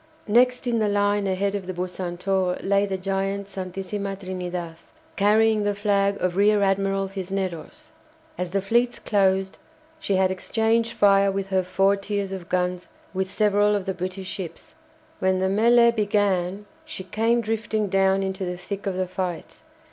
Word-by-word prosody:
Next 250 Hz, +4 st, +3 dB
in 235 Hz, -2 st, +1 dB
the 215 Hz, -, +2 dB
line 205 Hz, 0 st, +1 dB
ahead 195 Hz, +1 st, 0 dB
of 200 Hz, -3 st, -4 dB
the 185 Hz, -, -4 dB
"Bucentaure" 180 Hz, +1 st, -2 dB
lay 200 Hz, +1 st, +2 dB
the 190 Hz, -1 st, -2 dB
giant 195 Hz, +1 st, -2 dB
"Santisima 195 Hz, +1 st, -4 dB
Trinidad," 180 Hz, -3 st, -5 dB, 0.4 s
carrying 215 Hz, +2 st, +3 dB
the 205 Hz, 0 st, 0 dB
flag 200 Hz, -1 st, +1 dB
of 180 Hz, -1 st, -1 dB
Rear 205 Hz, +1 st, +4 dB
Admiral 195 Hz, 0 st, +1 dB
Cisneros. 190 Hz, -, -5 dB, 0.4 s
As 180 Hz, -1 st, -3 dB
the 195 Hz, +1 st, -1 dB
fleets 240 Hz, +4 st, +1 dB
closed, 195 Hz, -2 st, +1 dB, 0.4 s
she 200 Hz, -11 st, -1 dB
had 190 Hz, 0 st, +3 dB
exchanged 225 Hz, +4 st, 0 dB
fire 200 Hz, -1 st, +4 dB
with 195 Hz, 0 st, -3 dB
her 190 Hz, -1 st, +2 dB
four 195 Hz, +2 st, +2 dB
tiers 200 Hz, -1 st, -3 dB
of 185 Hz, -3 st, -7 dB
guns 180 Hz, 0 st, -1 dB, 0.3 s
with 190 Hz, 0 st, -2 dB
several 205 Hz, +1 st, +2 dB
of 200 Hz, -2 st, -2 dB
the 190 Hz, -, -1 dB
British 185 Hz, +1 st, -5 dB
ships. 195 Hz, -, -7 dB, 0.5 s
When 185 Hz, 0 st, +2 dB
the 190 Hz, -, +1 dB
mêlée 235 Hz, +3 st, +5 dB
began 205 Hz, -2 st, 0 dB, 0.2 s
she 315 Hz, -11 st, -7 dB
came 225 Hz, +5 st, +1 dB
drifting 220 Hz, -1 st, -1 dB
down 195 Hz, 0 st, +2 dB
into 190 Hz, 0 st, -3 dB
the 180 Hz, -1 st, -3 dB
thick 200 Hz, +3 st, -6 dB
of 190 Hz, -, -1 dB
the 185 Hz, 0 st, -1 dB
fight. 180 Hz, -2 st, -5 dB
195 Hz, 165 wpm, -24 LUFS, 185-205 Hz, 0.5 s, mêlée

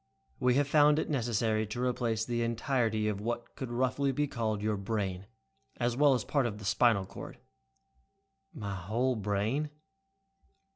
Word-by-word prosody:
We 125 Hz, 0 st, +3 dB
have 145 Hz, 0 st, +3 dB
found 150 Hz, 0 st, +5 dB
it 155 Hz, -, -1 dB
necessary 110 Hz, -4 st, 0 dB
to 120 Hz, +4 st, -3 dB
replace 120 Hz, -3 st, 0 dB
the 120 Hz, -1 st, -1 dB
entirety 115 Hz, -2 st, 0 dB
of 105 Hz, -2 st, -2 dB
what 120 Hz, +1 st, -4 dB
could 130 Hz, -, -5 dB
roughly 130 Hz, +3 st, +1 dB
be 145 Hz, +3 st, 0 dB
called 110 Hz, -5 st, -2 dB
your 110 Hz, 0 st, +1 dB
'brain', 100 Hz, -2 st, -3 dB, 0.5 s
as 120 Hz, 0 st, 0 dB
well 140 Hz, 0 st, +5 dB
as 120 Hz, -, -2 dB
part 140 Hz, -4 st, +1 dB
of 105 Hz, -3 st, -5 dB
the 105 Hz, -, -9 dB
spinal 105 Hz, -1 st, +3 dB
cord." -, -, -9 dB, 1.1 s
"My 105 Hz, -, -5 dB
whole 110 Hz, +8 st, 0 dB
brain?" 105 Hz, +8 st, -1 dB
115 Hz, 155 wpm, -31 LUFS, 105-130 Hz, 1.1 s, found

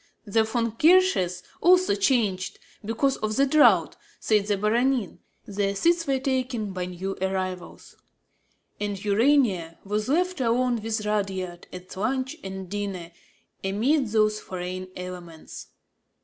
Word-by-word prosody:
The 220 Hz, +2 st, +2 dB
Von 230 Hz, +1 st, -1 dB
Rothkirches 300 Hz, -, +3 dB, 0.2 s
also 365 Hz, -, +5 dB
changed, 200 Hz, -3 st, 0 dB, 0.3 s
because 230 Hz, +6 st, 0 dB
of 215 Hz, 0 st, -2 dB
the 275 Hz, -, +4 dB
draught, 295 Hz, +2 st, +4 dB, 0.2 s
said 210 Hz, -2 st, +1 dB
the 205 Hz, -1 st, +1 dB
Baronin; 235 Hz, +1 st, 0 dB, 0.3 s
their 200 Hz, 0 st, -1 dB
seats 335 Hz, -, +2 dB
were 270 Hz, -1 st, +2 dB
taken 255 Hz, -5 st, -2 dB
by 180 Hz, -1 st, -3 dB
new 185 Hz, +2 st, -5 dB
arrivals; 185 Hz, -1 st, -4 dB, 0.8 s
and 205 Hz, -1 st, -2 dB
Urania 205 Hz, -, +2 dB
was 210 Hz, +3 st, -2 dB
left 360 Hz, +1 st, +1 dB
alone 240 Hz, 0 st, +1 dB
with 220 Hz, -1 st, -3 dB
Rudyard 190 Hz, -4 st, -3 dB
at 180 Hz, 0 st, -10 dB
lunch 260 Hz, +8 st, -2 dB
and 190 Hz, -1 st, -6 dB
dinner, 195 Hz, -3 st, -5 dB, 0.5 s
amid 240 Hz, +9 st, +1 dB
those 215 Hz, 0 st, +2 dB
foreign 185 Hz, 0 st, -6 dB
elements. 180 Hz, -3 st, -9 dB
210 Hz, 125 wpm, -25 LUFS, 190-255 Hz, 0.8 s, also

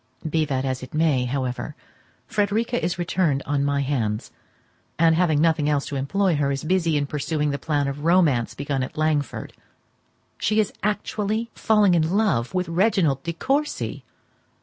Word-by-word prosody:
Be 155 Hz, 0 st, +1 dB
that 135 Hz, -2 st, -1 dB
as 130 Hz, -1 st, -2 dB
it 130 Hz, +3 st, -9 dB
may, 150 Hz, -5 st, +2 dB
however, 125 Hz, -1 st, -3 dB, 0.5 s
Frederica 220 Hz, +4 st, 0 dB
is 175 Hz, 0 st, -1 dB
returned 170 Hz, -5 st, 0 dB
on 145 Hz, -1 st, 0 dB
my 140 Hz, 0 st, +1 dB
hands; 115 Hz, -6 st, -2 dB, 0.7 s
and, 165 Hz, 0 st, +5 dB
having 160 Hz, -3 st, +2 dB
nothing 155 Hz, -2 st, +2 dB
else 145 Hz, -2 st, +1 dB
to 145 Hz, -, -5 dB
employ 170 Hz, +6 st, +1 dB
her, 140 Hz, -1 st, +1 dB
is 135 Hz, -, -3 dB
busy 165 Hz, -2 st, +1 dB
in 145 Hz, -, 0 dB
pursuing 150 Hz, +1 st, -1 dB
the 140 Hz, -, -3 dB
plan 145 Hz, -3 st, 0 dB
of 140 Hz, +1 st, -5 dB
romance 160 Hz, -9 st, +3 dB
begun 140 Hz, -1 st, -2 dB
at 130 Hz, -, -5 dB
Langford. 155 Hz, -3 st, -1 dB, 0.9 s
She 215 Hz, 0 st, +1 dB
is 215 Hz, -, +1 dB
actually 210 Hz, +2 st, -1 dB
falling 210 Hz, -4 st, +3 dB
in 170 Hz, +3 st, +2 dB
love 145 Hz, -, +1 dB
with 180 Hz, 0 st, 0 dB
Reginald 170 Hz, -, +2 dB
De 170 Hz, +2 st, -4 dB
Courcy! 280 Hz, -, -2 dB
155 Hz, 165 wpm, -23 LUFS, 140-185 Hz, 0.9 s, and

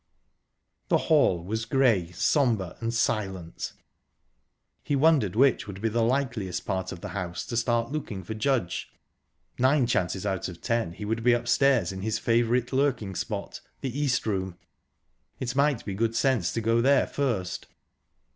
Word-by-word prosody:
The -, -, +4 dB
hall 85 Hz, -2 st, +3 dB
was 110 Hz, +5 st, -3 dB
grey, 115 Hz, -9 st, +2 dB
sombre, 105 Hz, -, +1 dB
and 115 Hz, 0 st, -2 dB
silent. 95 Hz, -7 st, -2 dB, 1.1 s
He 145 Hz, -, -1 dB
wondered 140 Hz, -, +3 dB
which 130 Hz, -1 st, +3 dB
would 100 Hz, -2 st, -7 dB
be 115 Hz, +2 st, 0 dB
the 115 Hz, +2 st, 0 dB
likeliest 120 Hz, -6 st, -1 dB
part 95 Hz, -1 st, -2 dB
of 85 Hz, -, -8 dB
the -, -, -6 dB
house 90 Hz, -3 st, -4 dB
to 120 Hz, -, -5 dB
start 120 Hz, +1 st, +1 dB
looking 110 Hz, -11 st, -4 dB
for 100 Hz, -, -5 dB
Judge...Nine 130 Hz, -, -2 dB
chances 95 Hz, -4 st, -1 dB
out 95 Hz, -3 st, -1 dB
of 85 Hz, -1 st, -10 dB
ten, 115 Hz, -7 st, -1 dB
he 105 Hz, +4 st, -7 dB
would 115 Hz, +2 st, -1 dB
be 120 Hz, +1 st, +4 dB
upstairs 120 Hz, -, +2 dB
in 95 Hz, 0 st, -6 dB
his 110 Hz, +2 st, -1 dB
favourite 120 Hz, +2 st, +1 dB
lurking 130 Hz, -8 st, +1 dB
spot 85 Hz, -, -4 dB, 0.2 s
the 130 Hz, -2 st, -4 dB
East 140 Hz, -4 st, 0 dB
Room. 95 Hz, -4 st, -2 dB, 0.8 s
It 125 Hz, 0 st, -3 dB
might 140 Hz, -3 st, +2 dB
be 100 Hz, -, -3 dB
good 115 Hz, +3 st, 0 dB
sense 120 Hz, -8 st, +2 dB
to 115 Hz, -, -1 dB
go 115 Hz, +1 st, +2 dB
there 135 Hz, +2 st, +4 dB
first... 110 Hz, -10 st, -2 dB
115 Hz, 155 wpm, -27 LUFS, 95-130 Hz, 1.1 s, The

